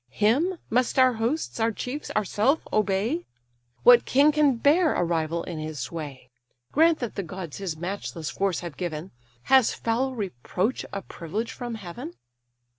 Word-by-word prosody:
Him 265 - +2
must 250 +3 +1
our 255 -1 +6
hosts, 235 +6 -2
our 225 0 +2
chiefs, 255 +7 -5
ourself 215 - +2
obey? 215 - +1 0.6
What 245 -1 +8
king 285 +3 +4
can 295 -3 +3
bear 300 +7 +3
a - - +2
rival 165 0 -1
in 170 -3 -6
his 155 -1 -5
sway? 140 -6 -6 0.4
Grant 325 +2 +4
that 240 - -3
the - - -3
gods 175 -3 -7
his 180 -5 -4
matchless 175 -2 -4
force 195 -4 -1
have 170 -4 -7
given; 170 -1 -4 0.3
Has 265 -3 +4
foul 255 +3 -1
reproach 195 - -2
a 195 -1 -5
privilege 205 +8 -4
from 240 -2 -5
heaven?" 225 - -8
215 Hz, 155 wpm, -26 LUFS, 175-260 Hz, 0.6 s, What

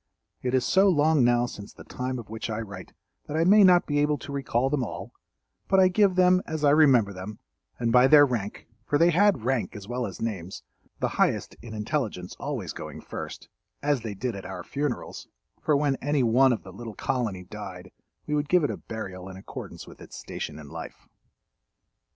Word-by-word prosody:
It 125 0 0
is 130 - +2
so 195 +1 +4
long 155 -4 +3
now 120 0 +3
since 105 -4 -9
the - - -13
time 125 0 -4
of 115 -4 -8
which 110 +1 -5
I 110 0 -2
write 100 -4 -8 0.3
that 150 - -3
I 165 - +3
may 205 +4 +7
not 180 -2 +6
be 145 -1 0
able 150 0 +2
to - - -9
recall 135 -2 0
them 135 -1 0
all, 115 - -7 0.5
but 195 - +4
I 185 -1 +6
give 190 0 +3
them 185 0 +5
as 160 -1 -4
I 145 - +5
remember 135 -9 +5
them 95 +3 -7 0.4
and 115 -1 0
by 125 +2 +6
their 145 +1 +8
rank—for 115 +2 -3
they 170 +3 +5
had 195 - +3
rank 125 -2 -1
as 100 -2 -9
well 120 0 -2
as 95 - -9
names, 95 -5 -4 0.4
the - - +1
highest - - 0
in 110 -1 -8
intelligence 105 -5 -3
always - - -4
going - - -8
first—as 145 -3 -5
they 110 -3 -5
did 120 +2 -3
at 100 - -7
our 90 -2 -6
funerals; 145 - -4 0.3
for 150 - +2
when 140 -2 +1
any 145 0 0
one 125 +3 +5
of 120 - -2
the 95 - -11
little 115 +1 -8
colony 105 -8 -2
died 90 - -9 0.3
we 150 - -3
would 150 0 0
give 180 -2 +4
it 145 - +1
a 105 - -5
burial 95 -4 -7
in 95 - -9
accordance 95 - -9
with - - -14
its - - -10
station 75 - -6
in 75 -2 -11
life. - - -9
125 Hz, 205 wpm, -26 LUFS, 105-150 Hz, 0.5 s, their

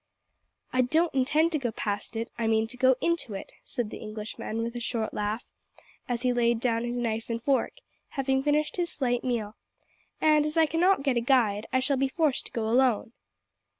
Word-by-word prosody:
"I 255 - +4
don't 315 +7 +2
intend 295 +5 +2
to 310 - 0
go 245 -4 -1
past 205 +1 -3
it. 225 +1 -3
I 230 -1 -1
mean 220 0 +3
to 250 - -4
go 260 +1 +4
into 335 -11 0
it," 195 - -7
said 240 -5 -4
the - - -7
Englishman, 215 +1 -5
with 235 +1 -4
a - - -2
short 230 -2 -2
laugh, 210 +2 -2 0.6
as 240 0 -2
he 250 -1 +2
laid 235 -1 +2
down 230 -1 0
his 240 0 -3
knife 225 -1 -2
and 230 0 -1
fork, 265 +3 +1 0.4
having 265 0 +1
finished 295 +3 +1
his 345 -1 0
slight 245 -3 0
meal; 225 -4 -2 0.6
"and, 305 -1 +4
as 305 +2 -3
I 325 - +6
cannot 330 +1 +2
get 270 -4 +1
a - - +2
guide, 230 -5 +2
I 260 - +2
shall 275 +1 +1
be 270 +1 +2
forced 300 -2 0
to - - -19
go 225 -2 -2
alone." 240 -1 +2
245 Hz, 205 wpm, -28 LUFS, 225-275 Hz, 0.6 s, I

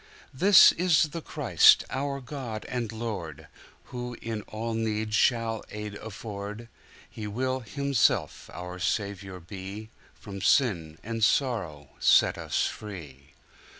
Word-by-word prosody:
This 190 +8 +8
is 160 -4 +2
the 165 +3 -6
Christ, - - +5
our 140 +1 -2
God 120 -5 -6
and 120 -3 -3
Lord, 90 -10 -6 0.5
Who 125 -1 -5
in 115 -2 -4
all 115 +1 -4
need 110 -1 -2
shall 115 0 +2
aid 105 0 -6
afford:He 105 +1 -9
will 130 +5 -1
Himself 140 +1 0
our 90 +1 -7
Saviour 95 -1 -3
be, 95 +5 -8 0.2
From 100 -2 -9
sin 85 - +2
and 115 0 -3
sorrow 100 - 0
set - - +4
us - - 0
free. 75 -9 -8
110 Hz, 115 wpm, -27 LUFS, 100-125 Hz, 0.5 s, This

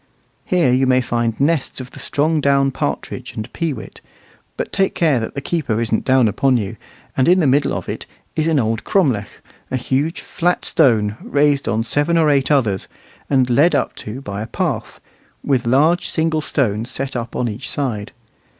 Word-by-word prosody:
Here 170 -9 +2
you 130 +1 +3
may 130 0 +4
find 120 -2 -1
nests 145 -1 0
of 130 0 -8
the - - -11
strong 155 +1 +1
down 140 -1 +3
partridge - - -4
and 110 - -6
peewit, 165 -5 -4 0.6
but - - -4
take 195 -1 +1
care 155 -7 +3
that 110 - -5
the 140 - -3
keeper 135 -8 -1
isn't 115 -1 -1
down 130 -3 +4
upon 130 +5 +2
you; 105 0 -3 0.4
and 130 - +2
in 180 +2 +5
the 165 - +2
middle 140 +1 +3
of - - -4
it - - -5 0.3
is 155 0 +1
an 160 -2 +2
old 115 -3 0
cromlech, 130 - 0 0.3
a 130 - -1
huge 135 +6 -1
flat 175 +1 -1
stone 110 -8 +2
raised 145 -1 +1
on 110 +1 +1
seven 145 +8 +1
or 155 -2 +4
eight 135 -2 +2
others, 115 -10 +1 0.4
and 130 -3 +3
led 145 +8 +4
up - - 0
to 110 +5 -7
by 100 -5 -5
a 110 - -4
path, - - -3 0.4
with 130 -4 0
large 155 +8 +3
single 160 -1 +1
stones 115 -6 0
set 135 +1 -4
up 120 -1 -4
on 125 - 0
each 110 +1 -5
side. 115 -7 -2
135 Hz, 185 wpm, -19 LUFS, 115-150 Hz, 0.6 s, in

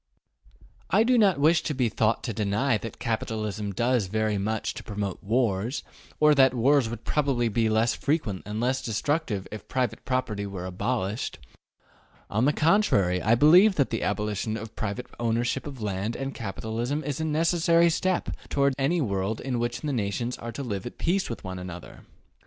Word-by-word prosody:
I 220 - +4
do 250 +2 +3
not 200 -9 +4
wish 160 +3 +4
to 150 - -3
be 125 -2 +2
thought 110 0 +1
to 115 - -3
deny 105 +4 +1
that 115 0 -7
capitalism 110 -2 -3
does 120 +1 +1
very 110 0 0
much 110 +2 -2
to - - -8
promote 100 -3 -4
wars, 115 +2 0 0.4
or 150 0 +6
that 130 -2 +5
wars 130 0 +3
would 115 -1 -7
probably 135 -6 +1
be 110 +1 +1
less 110 +2 +2
frequent 140 - -1
and 105 +1 -3
less 130 +2 0
destructive 115 - -1
if 110 - -8
private 125 -4 -2
property 115 -6 -2
were 95 -2 -6
abolished. 100 +3 -2 0.9
On 110 +4 +2
the 145 - +4
contrary, 150 - +2
I 115 +2 +4
believe 180 - +6
that 140 -5 +1
the 115 - -1
abolition 105 +1 -1
of 110 -1 -8
private 110 +4 -3
ownership 120 +4 0
of 135 -6 -7
land 100 +2 -2
and 135 0 -4
capital 110 0 -5
is 120 +1 -1
a 145 0 -2
necessary 165 +2 +3
step 185 +2 0 0.2
toward 140 -1 +2
any 165 +6 +2
world 100 -2 -1
in 125 -3 -2
which 120 0 -2
the 150 -2 -2
nations 120 +2 -2
are 115 - -5
to 140 +5 -5
live 100 -4 -4
at - - -10
peace 190 +3 0
with 115 - -6
one 95 -1 -5
another. 90 -1 -9
120 Hz, 180 wpm, -26 LUFS, 105-140 Hz, 0.9 s, or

